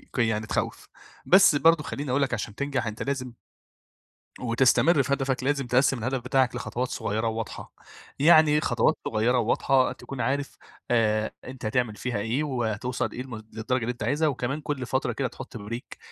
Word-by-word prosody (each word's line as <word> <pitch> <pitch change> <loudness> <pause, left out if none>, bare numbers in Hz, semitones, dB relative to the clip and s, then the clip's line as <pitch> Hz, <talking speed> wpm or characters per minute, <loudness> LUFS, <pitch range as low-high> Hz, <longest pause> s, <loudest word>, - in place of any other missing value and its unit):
ك - - -2
يعني 110 -2 +1
تخوّف، - - -3 0.4
بس 185 -5 +6
برضه 165 +1 +4
خلّيني 145 -2 -5
اقول 140 - +2
لك 135 -3 0
عشان 105 -2 -4
تنجح 140 -4 -2
أنت 110 0 -4
لازم 130 -3 -3 1.1
وتستمر 130 +6 +3
في 140 +2 0
هدفك 135 -2 -1
لازم 140 -2 0
تقسّم 130 +2 +3
الهدف 130 +3 -2
بتاعك 130 -1 +1
لخطوات 125 +1 -3
صغيّرة 110 0 -2
وواضحة، 110 0 -5 0.5
يعني 155 0 +6
خطوات - - +2
صغيّرة 115 +3 +1
وواضحة 130 +3 +2
تكون 135 -2 -7
عارف 140 +1 -2 0.3
آآ 110 -2 +2
أنت 125 -2 -8
هتعمل 110 0 0
فيها 120 -1 -3
إيه 115 +8 -1
وهتوصل 125 -3 -2
إيه 125 - -6
للم 130 -2 -7 0.2
للدرجة 120 +3 -1
اللي 115 - -1
أنت 125 - -7
عايزها، 155 +2 +1
وكمان 135 +1 -2
كل 140 -3 -3
فترة 125 -1 -1
كده 130 +3 -1
تحط 130 0 -9
Break 115 +4 -7
125 Hz, 170 wpm, -26 LUFS, 115-140 Hz, 1.1 s, بس